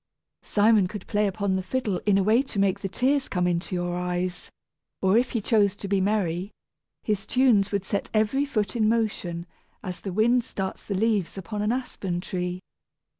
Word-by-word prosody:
Simon 210 -2 +3
could 205 +1 -7
play 210 -1 +1
upon 195 0 -1
the 190 - 0
fiddle 210 -2 -2
in 200 -2 +5
a 195 - +3
way 220 +5 +4
to 270 -6 -7
make 195 0 +2
the 195 - -4
tears 265 +7 +1
come 180 -2 0
into 175 +1 -1
your 175 0 -1
eyes; 180 0 -3 0.5
or 190 +1 +3
if 245 +2 +2
he 235 - +1
chose 205 -2 +3
to 200 - -7
be 195 -1 +1
merry, 190 -2 0 0.5
his 205 -2 -1
tunes 235 -7 +3
would 200 -2 -1
set 200 - -2
every 220 +6 +2
foot 215 -9 -1
in 215 -2 +3
motion, 200 -7 -1 0.4
as 180 -1 -6
the 195 - -4
wind 235 +5 +3
starts 190 -4 -4
the 200 - -4
leaves 205 -3 0
upon 205 +3 -4
an 210 +2 +1
aspen 205 -8 -3
tree. 180 0 -3
200 Hz, 190 wpm, -26 LUFS, 185-220 Hz, 0.5 s, in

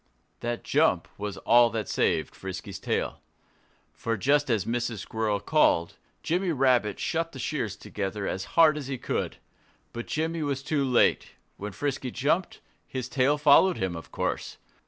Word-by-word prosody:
That 120 0 -3
jump 115 - +2
was 100 -1 -5
all 120 +4 +5
that 110 -2 -3
saved - - 0
Frisky's 95 0 -7
tail. - - -2 0.7
For 115 -1 -2
just 145 +6 +2
as 110 -5 +1
Mrs. 120 -1 -2
Squirrel 105 0 -1
called, 100 - +2 0.3
Jimmy 180 +2 0
Rabbit 125 - +2
shut 165 0 -1
the - - -8
shears 120 -6 -2
together 100 -1 -4
as 95 0 -3
hard 155 -2 +6
as 140 - -7
he 135 -1 -3
could. - - -3 0.6
But 120 0 -6
Jimmy 160 +1 -1
was 140 -2 -2
too 150 -1 0
late. 125 -3 +2 0.2
When 105 +1 -5
Frisky 135 +2 -3
jumped, 145 +9 -1 0.3
his 130 -2 -4
tail 140 +2 +2
followed 150 +5 +5
him, 95 -2 -2
of 80 - -9
course. - - -3
125 Hz, 155 wpm, -27 LUFS, 105-145 Hz, 0.7 s, hard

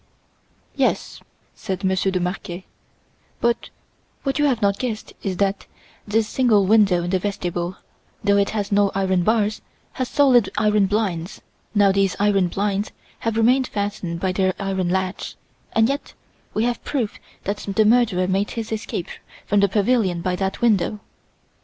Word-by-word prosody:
"Yes," - - 0 0.3
said 190 -1 -5
Monsieur 190 0 +1
de 185 -1 0
Marquet, 180 0 -4 0.7
"but 235 0 0 0.5
what 275 +1 -1
you 295 - +4
have 260 -5 +2
not 200 -2 +1
guessed 230 -4 -4
is 190 -3 -3
that 195 0 0 0.4
this 215 +1 +1
single 220 -5 +3
window 195 -4 +4
in 175 - -3
the 190 - +2
vestibule, 180 -2 -3 0.5
though 200 0 +3
it 200 0 +2
has 205 -2 -3
no 200 -1 +3
iron 190 -2 +2
bars, 215 +2 +1 0.3
has 255 -2 -3
solid 255 -7 +4
iron 210 -1 +3
blinds. 195 -4 -2 0.3
Now 200 -1 +5
these 195 -1 +1
iron 200 -2 +3
blinds 200 +2 -1 0.3
have 225 -1 -2
remained 250 +3 +3
fastened 200 -5 -3
by 185 +1 0
their 185 0 +1
iron 190 -3 -1
latch; 185 +1 -2 0.4
and 225 0 +4
yet 280 +2 -4 0.4
we 215 - +2
have 240 0 -1
proof 250 -8 -2 0.2
that 200 +1 -2
the 205 +1 +1
murderer 215 -5 +3
made 195 +2 0
his 225 -2 -5
escape 215 -5 -3 0.4
from 205 - +2
the 200 0 +4
pavilion 200 -3 +1
by 180 +1 -1
that 190 0 -2
window! 215 -2 +2
200 Hz, 160 wpm, -22 LUFS, 190-220 Hz, 0.7 s, Now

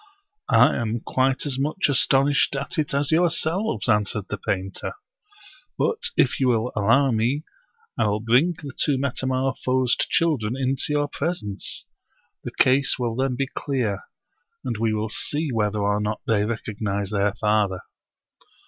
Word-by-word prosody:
I - - +5
am 115 -1 -2
quite 130 +2 0
as 135 -2 -2
much 150 +7 0
astonished 140 +1 +3
at 135 - -3
it 155 +2 -1
as 140 +1 0
yourselves," 170 +5 +1
answered 105 -2 0
the - - -4
painter; 95 0 -3 0.4
" 305 -6 -24
but 455 - 0 0.2
if - - +3
you 130 - +2
will 120 0 +1
al 100 -2 -1
low 135 +3 +4
me, 120 +7 0 0.6
I - - +3
will 105 +1 0
bring 125 +10 +3
the 145 -4 -9
two 145 -3 +1
metamorphosed 130 -1 0
children 130 -8 +1
into 135 0 0
your 145 0 +1
presence. 140 - -4 0.6
The - - -4
case 135 +2 +3
will 120 -3 -1
then 130 0 0
be 135 +2 0
clear, 125 -7 -2 0.6
and 125 -3 -2
we 115 0 +1
will 110 0 -2
see 150 +7 -2
whether 105 -2 0
or 100 0 +1
not 105 +1 -2
they 105 -2 +2
recognize 105 -3 -3
their 100 -1 +1
father." 105 -3 +1
130 Hz, 155 wpm, -24 LUFS, 105-140 Hz, 0.6 s, I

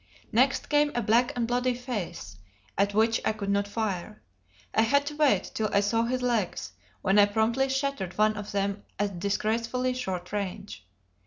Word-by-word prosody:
Next 260 +5 +2
came 295 0 +3
a 240 - +1
black 235 +4 +3
and 235 -2 0
bloody 245 +1 +1
face, 215 - -5 0.4
at 200 +1 +1
which 225 +1 +3
I - - +1
could 200 -2 -3
not 200 0 +1
fire. 210 -1 -3 0.5
I - - +4
had 280 +5 +3
to 295 0 -5
wait 290 -11 +2
till 215 -1 -1
I 200 - +3
saw 225 +3 +1
his 255 +1 -1
legs, 220 - -1 0.3
when 195 +2 +4
I 205 - +7
promptly 230 +6 +1
shattered 270 -9 -2
one 215 0 +3
of 205 0 -6
them 200 0 -1 0.2
at 200 -3 -2
disgracefully 230 +6 0
short 185 -8 -4
range. 200 - -5
220 Hz, 175 wpm, -27 LUFS, 200-250 Hz, 0.5 s, I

